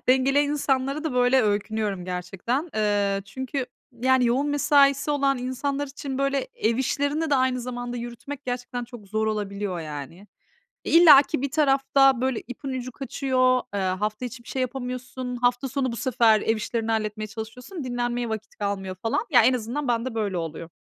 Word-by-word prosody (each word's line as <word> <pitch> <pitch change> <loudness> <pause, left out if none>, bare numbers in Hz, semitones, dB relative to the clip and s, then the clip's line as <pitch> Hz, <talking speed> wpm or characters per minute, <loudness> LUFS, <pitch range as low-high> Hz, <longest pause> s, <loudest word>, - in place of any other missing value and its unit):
Dengeleyen 275 +3 +4
insanlara 275 0 0
da 315 - -1
böyle 250 +1 +4
öykünüyorum 210 -2 -1
gerçekten. 195 - -3
Eee, 205 -2 +1
çünkü 260 +5 -4 0.4
yani 260 -1 +4
yoğun 260 +5 +1
mesaisi 285 -1 +3
olan 275 -2 +2
insanlar 275 +3 -2
için, 270 -1 -6
böyle, 275 -1 0
ev 225 +1 +1
işlerini 285 +4 0
de - - +4
aynı 255 -1 +2
zamanda 245 0 -5
yürütmek 240 +4 -7
gerçekten 245 -1 -4
çok 235 -4 -12
zor 215 +2 -1
olabiliyor. 200 -3 -2
E, 155 +5 -8 0.6
illaki 300 -6 +7
bir 280 -1 -2
tarafta, 270 -3 +3
böyle, 260 -3 0
ipin 255 +3 -7
ucu 255 -1 -4
kaçıyor, 255 -1 +1
ııı, 190 -2 0
hafta 210 +5 -3
içi 240 0 -8
bir - - -19
şey 260 - -2
yapamıyorsun, 250 0 -4
hafta 245 +1 +1
sonu 260 -1 -1
bu - - -4
sefer 230 -4 +3
ev 225 - +1
işlerini 225 +1 -2
halletmeye 215 -1 -2
çalışıyorsun, 225 - -7
dinlenmeye 245 -1 -2
vakit 220 -1 -6
kalmıyor 195 -2 -3
falan. 225 +5 -1
Ya, 245 -4 +7
en 255 +3 +5
azından 250 +4 -3
bende 235 0 -1
böyle 205 -4 -1
oluyor. 165 0 -5
250 Hz, 165 wpm, -25 LUFS, 220-270 Hz, 0.6 s, illaki